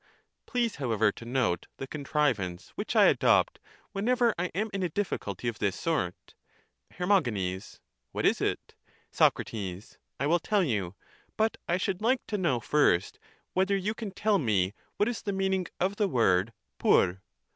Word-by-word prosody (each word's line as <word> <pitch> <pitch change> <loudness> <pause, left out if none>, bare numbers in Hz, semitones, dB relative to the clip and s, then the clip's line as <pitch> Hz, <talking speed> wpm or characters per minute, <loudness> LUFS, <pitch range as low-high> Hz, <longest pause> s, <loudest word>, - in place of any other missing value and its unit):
Please; 240 -3 0
however, 110 -6 +2
to 115 - -11
note 120 -8 0
the 135 - -5
con 145 +2 -7
trivance 110 - 0
which - - -5
I - - +7
adopt - - +3 0.3
whenever 235 +3 +2
I 175 - -1
am 215 +2 -1
in 195 - -2
a 180 - 0
difficulty 125 - -3
of 115 -3 -3
this 100 -3 0
sort. 150 - -2 0.6
Her. 180 - -3
What 105 - -2
is - - +3
it> - - -2 0.4
Soc. - - +4
I 100 +5 -6
will 170 +4 +3
tell 200 +4 +1
you; 100 - -1 0.4
but 220 +1 +1
I 175 - +2
should 190 0 -2
like 245 +3 +1
to 210 - -1
know 150 -10 +1
first 115 -8 +2 0.3
whether 190 +2 +2
you 200 +3 -1
can 225 -2 -5
tell 205 +1 +1
me 100 - +1 0.2
what 205 - +2
is 240 -2 -2
the 205 - -2
meaning 190 -2 0
of 195 +3 0
the 210 - +2
word 110 - +2 0.3
TTVp? 90 +2 +3
155 Hz, 165 wpm, -29 LUFS, -, 0.6 s, I